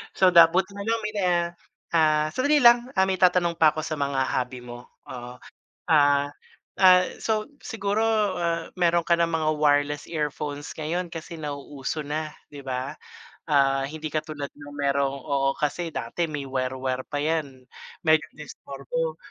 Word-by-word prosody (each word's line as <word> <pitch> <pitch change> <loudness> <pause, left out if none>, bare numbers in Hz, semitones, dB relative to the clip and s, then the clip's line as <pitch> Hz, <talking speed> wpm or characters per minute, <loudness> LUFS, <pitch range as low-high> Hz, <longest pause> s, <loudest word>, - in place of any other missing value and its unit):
So, 185 -1 +5
dabut 170 +2 +7
nalang 220 +3 -2
may 210 - -2
na 185 - +1 0.7
ah, 155 -1 +3
sandali 290 - +2
lang, 240 +1 +6
ah, 190 - +4
may 190 -1 -1
itatanong 180 -2 +3
pa 155 -1 +6
ako 155 - -3
sa 155 -2 -4
mga 140 -1 0
hobby 125 0 -2
mo, 120 0 -10 0.2
oo. 125 0 -8 0.6
Ah 145 -2 +4 0.5
ah, 185 -1 +8 0.2
so, 215 -1 0 0.2
siguro, 205 0 -1 0.4
ah, 170 -1 -1
meron 170 -2 +2
ka 170 - +4
ng 170 0 +2
mga 160 -1 0
wireless 145 0 +2
earphones 150 -2 -4
ngayon 170 +3 -3
kasi 165 0 -7
nauuso 145 0 -5
na, 150 +1 -4 0.2
'di 145 -1 -10
ba? 130 +1 -4 0.5
Ah, 135 -1 +3
hindi 155 +2 -5
katulad 155 -2 -3
na 145 0 -12
merong, 140 -1 0
oo, 135 -2 +1
kasi 155 +3 -1
dati 135 +6 -3
may 145 -2 -4
wire 130 0 -2
wire 130 0 -2
pa 145 - -4
yan, 145 -4 -2 0.4
medyo 155 -1 +4
disturbo, 150 +2 -5
155 Hz, 155 wpm, -25 LUFS, 140-170 Hz, 0.7 s, ah